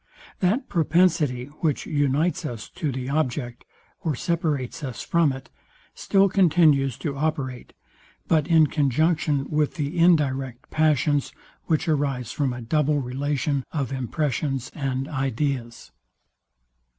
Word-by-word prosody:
That 210 Hz, +8 st, +1 dB
propensity, 160 Hz, -6 st, +2 dB
which 155 Hz, -4 st, 0 dB
unites 145 Hz, +3 st, +1 dB
us 120 Hz, -7 st, -6 dB
to 150 Hz, -4 st, -3 dB
the 130 Hz, 0 st, -4 dB
object, 130 Hz, -4 st, -2 dB, 0.3 s
or 155 Hz, -4 st, -2 dB
separates 155 Hz, -3 st, -2 dB
us 130 Hz, -5 st, -5 dB
from 170 Hz, -4 st, +2 dB
it, 135 Hz, 0 st, -9 dB, 0.4 s
still 195 Hz, 0 st, +3 dB
continues 155 Hz, -, +3 dB
to 145 Hz, -4 st, -4 dB
operate, 135 Hz, -4 st, -3 dB, 0.5 s
but 155 Hz, -2 st, +2 dB
in 165 Hz, -2 st, +6 dB
conjunction 150 Hz, 0 st, +1 dB
with 150 Hz, -1 st, +1 dB
the 150 Hz, +3 st, -3 dB
indirect 135 Hz, -7 st, +2 dB
passions, 150 Hz, -2 st, +2 dB, 0.3 s
which 160 Hz, +1 st, 0 dB
arise 140 Hz, -6 st, 0 dB
from 140 Hz, -2 st, 0 dB
a 125 Hz, 0 st, -6 dB
double 150 Hz, +4 st, +1 dB
relation 140 Hz, +1 st, -1 dB
of 140 Hz, -6 st, -2 dB
impressions 135 Hz, 0 st, -2 dB
and 135 Hz, -2 st, -2 dB
ideas. 135 Hz, -3 st, -3 dB
145 Hz, 120 wpm, -24 LUFS, 130-155 Hz, 0.5 s, in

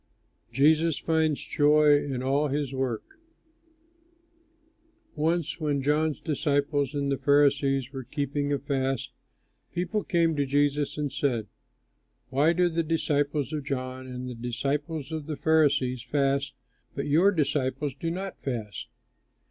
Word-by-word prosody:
JESUS 155 Hz, +3 st, +3 dB
FINDS 160 Hz, -2 st, 0 dB
JOY 150 Hz, -1 st, +4 dB
IN 130 Hz, -3 st, -3 dB
ALL 140 Hz, +3 st, +2 dB
HIS 140 Hz, -1 st, -2 dB
WORK 130 Hz, -4 st, -2 dB, 2.1 s
Once 165 Hz, +1 st, 0 dB
when 145 Hz, -3 st, -1 dB
John's 150 Hz, +2 st, +1 dB
disciples 145 Hz, -2 st, 0 dB
and 140 Hz, -1 st, 0 dB
the 135 Hz, -, -1 dB
Pharisees 140 Hz, -2 st, +2 dB
were 135 Hz, -1 st, -5 dB
keeping 145 Hz, +2 st, -2 dB
a 140 Hz, -, +2 dB
fast, 135 Hz, -1 st, -2 dB, 0.6 s
people 205 Hz, +4 st, -2 dB
came 165 Hz, -3 st, +2 dB
to 140 Hz, -, +1 dB
Jesus 145 Hz, +1 st, +1 dB
and 145 Hz, -2 st, -2 dB
said, 130 Hz, -6 st, 0 dB, 0.9 s
"Why 145 Hz, +5 st, +4 dB
do 180 Hz, +1 st, +3 dB
the 165 Hz, -1 st, 0 dB
disciples 150 Hz, -2 st, 0 dB
of 150 Hz, -2 st, -2 dB
John 130 Hz, -1 st, -4 dB
and 125 Hz, 0 st, -6 dB
the 125 Hz, -, -5 dB
disciples 140 Hz, +6 st, -3 dB
of 155 Hz, -2 st, -4 dB
the 155 Hz, -2 st, -4 dB
Pharisees 145 Hz, -6 st, +2 dB
fast, 135 Hz, +1 st, 0 dB, 0.4 s
but 140 Hz, -, -2 dB
your 165 Hz, +7 st, +4 dB
disciples 145 Hz, -4 st, -1 dB
do 155 Hz, +5 st, -4 dB
not 190 Hz, +3 st, -5 dB
fast?" 115 Hz, -6 st, -4 dB
145 Hz, 130 wpm, -27 LUFS, 135-155 Hz, 2.1 s, JOY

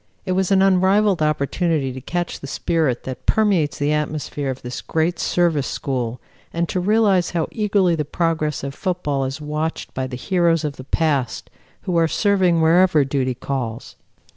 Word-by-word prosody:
It 185 Hz, -, -2 dB
was 185 Hz, 0 st, +1 dB
an 195 Hz, -1 st, +4 dB
unrivalled 195 Hz, 0 st, +3 dB
opportunity 150 Hz, -1 st, 0 dB
to 130 Hz, -, -8 dB
catch 175 Hz, +6 st, -3 dB
the 140 Hz, -, -8 dB
spirit 150 Hz, -3 st, 0 dB
that 130 Hz, -1 st, -7 dB
permeates 195 Hz, -9 st, +2 dB
the 145 Hz, +1 st, +1 dB
atmosphere 150 Hz, -2 st, -2 dB
of 130 Hz, 0 st, -5 dB
this 125 Hz, 0 st, -5 dB
great 165 Hz, +2 st, -1 dB
Service 165 Hz, -6 st, +1 dB
school 125 Hz, -3 st, -3 dB, 0.3 s
and 170 Hz, 0 st, -1 dB
to 185 Hz, -, -1 dB
realize 200 Hz, -2 st, +3 dB
how 160 Hz, -, 0 dB
eagerly 200 Hz, -4 st, +2 dB
the 155 Hz, -2 st, 0 dB
progress 155 Hz, -2 st, -1 dB
of 140 Hz, 0 st, -4 dB
football 150 Hz, -7 st, -2 dB
is 135 Hz, +3 st, -4 dB
watched 150 Hz, +2 st, -4 dB
by 130 Hz, 0 st, -2 dB
the 125 Hz, -1 st, -6 dB
heroes 170 Hz, 0 st, +1 dB
of 145 Hz, -2 st, -3 dB
the 130 Hz, -, -8 dB
past 140 Hz, -3 st, -1 dB, 0.3 s
who 180 Hz, -2 st, -1 dB
are 165 Hz, -1 st, +4 dB
serving 185 Hz, -3 st, +2 dB
wherever 165 Hz, -2 st, +4 dB
duty 130 Hz, -2 st, -1 dB
calls. 120 Hz, -3 st, -4 dB
160 Hz, 170 wpm, -21 LUFS, 140-180 Hz, 0.3 s, an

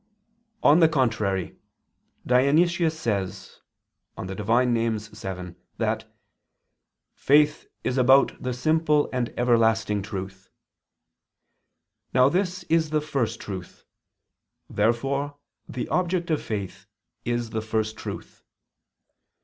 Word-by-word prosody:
On 150 Hz, +4 st, +6 dB
the 165 Hz, -2 st, +6 dB
contrary, 110 Hz, -, 0 dB, 0.7 s
Dionysius 160 Hz, +6 st, +3 dB
says 100 Hz, -, -3 dB, 0.6 s
(Div. 95 Hz, +2 st, -6 dB
Nom. 115 Hz, -1 st, +2 dB
vii) 95 Hz, -5 st, -7 dB, 0.2 s
that -, -, -2 dB, 1.0 s
"faith 150 Hz, +2 st, +3 dB, 0.2 s
is 130 Hz, +1 st, 0 dB
about 130 Hz, +2 st, +4 dB
the 125 Hz, -, -2 dB
simple 150 Hz, +3 st, +1 dB
and 125 Hz, -2 st, -1 dB
everlasting 110 Hz, -3 st, +2 dB
truth." 95 Hz, -1 st, -7 dB, 1.7 s
Now 130 Hz, +1 st, +6 dB
this 185 Hz, +1 st, -1 dB
is 160 Hz, -2 st, +1 dB
the 155 Hz, 0 st, +1 dB
First 120 Hz, -7 st, -2 dB
Truth. 95 Hz, -3 st, -8 dB, 0.8 s
Therefore 135 Hz, +7 st, 0 dB, 0.3 s
the 125 Hz, -, -4 dB
object 175 Hz, -1 st, 0 dB
of 155 Hz, -, +1 dB
faith 100 Hz, -4 st, -5 dB, 0.4 s
is 120 Hz, -1 st, -2 dB
the 110 Hz, -, -2 dB
First 110 Hz, 0 st, -2 dB
Truth. 110 Hz, -, -8 dB
120 Hz, 100 wpm, -25 LUFS, 110-150 Hz, 1.7 s, On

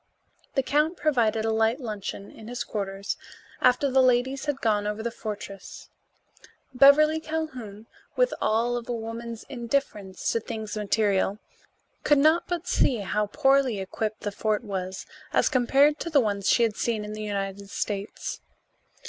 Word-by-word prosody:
The 270 Hz, -, +2 dB
count 300 Hz, +6 st, +1 dB
provided 230 Hz, -7 st, +1 dB
a 225 Hz, -, +1 dB
light 225 Hz, +3 st, +2 dB
luncheon 205 Hz, -4 st, -6 dB
in 220 Hz, -, -12 dB
his 245 Hz, +1 st, -3 dB
quarters 200 Hz, -1 st, -4 dB, 0.4 s
after 250 Hz, +3 st, +4 dB
the 265 Hz, 0 st, +5 dB
ladies 255 Hz, +2 st, +2 dB
had 290 Hz, -2 st, -1 dB
gone 210 Hz, -3 st, +1 dB
over 210 Hz, +1 st, -3 dB
the 235 Hz, -, -2 dB
fortress. 205 Hz, -3 st, -8 dB, 0.8 s
Beverly 300 Hz, +4 st, +6 dB
Calhoun, 260 Hz, -10 st, -5 dB, 0.3 s
with -, -, +2 dB
all 235 Hz, +2 st, +1 dB
of 235 Hz, 0 st, -7 dB
a -, -, 0 dB
woman's 230 Hz, 0 st, -6 dB
indifference 235 Hz, -7 st, -2 dB
to 230 Hz, -, +1 dB
things 220 Hz, -2 st, -6 dB
material, 205 Hz, -1 st, +1 dB, 0.7 s
could 295 Hz, -, +4 dB
not 310 Hz, +4 st, +4 dB
but 350 Hz, -1 st, -3 dB
see 265 Hz, -, +3 dB
how 210 Hz, +2 st, -1 dB
poorly 270 Hz, -2 st, +2 dB
equipped 215 Hz, +3 st, -3 dB
the 205 Hz, -, -3 dB
fort 215 Hz, +2 st, -1 dB
was 190 Hz, -3 st, -4 dB, 0.3 s
as -, -, +3 dB
compared 275 Hz, +3 st, +3 dB
to 335 Hz, -, -3 dB
the 300 Hz, -3 st, +4 dB
ones 205 Hz, -5 st, 0 dB
she 235 Hz, -, +4 dB
had 220 Hz, -3 st, +1 dB
seen 220 Hz, -3 st, -1 dB
in 210 Hz, -, -6 dB
the 215 Hz, -, -6 dB
United 200 Hz, -1 st, -4 dB
States. 200 Hz, 0 st, -4 dB
225 Hz, 155 wpm, -26 LUFS, 210-270 Hz, 0.8 s, Beverly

